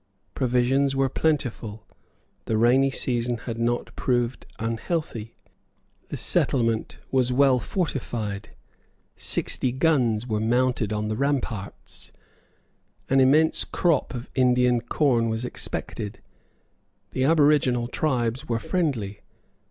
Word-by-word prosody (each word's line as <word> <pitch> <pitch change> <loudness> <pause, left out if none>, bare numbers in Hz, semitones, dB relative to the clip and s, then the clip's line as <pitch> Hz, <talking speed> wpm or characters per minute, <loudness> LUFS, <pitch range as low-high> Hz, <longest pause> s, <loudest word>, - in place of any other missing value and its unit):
Provisions 130 +2 +2
were 135 0 +2
plentiful. 120 -8 -1 0.6
The 110 - 0
rainy 125 +4 +4
season 120 -2 -1
had 115 0 -6
not 120 +1 -1
proved 120 -1 -1
unhealthy. 115 0 -3 0.7
The - - -4
settlement 115 -4 +1
was 130 -2 +2
well 130 0 +4
fortified. 120 - -3 0.7
Sixty 130 - +1
guns 125 -6 +2
were 110 -3 -1
mounted 120 -1 +1
on 105 0 -1
the 110 - -1
ramparts. 120 -7 -3 1.0
An 135 - +5
immense 150 +5 +4
crop 170 -6 0
of 120 0 -6
Indian 125 -2 +3
corn 120 -2 +1
was 110 +2 -2
expected. 105 -3 -5 0.9
The 130 - -1
aboriginal 145 -6 +3
tribes 130 0 -1
were 115 - +1
friendly. 115 - -2
125 Hz, 105 wpm, -25 LUFS, 115-135 Hz, 1.0 s, An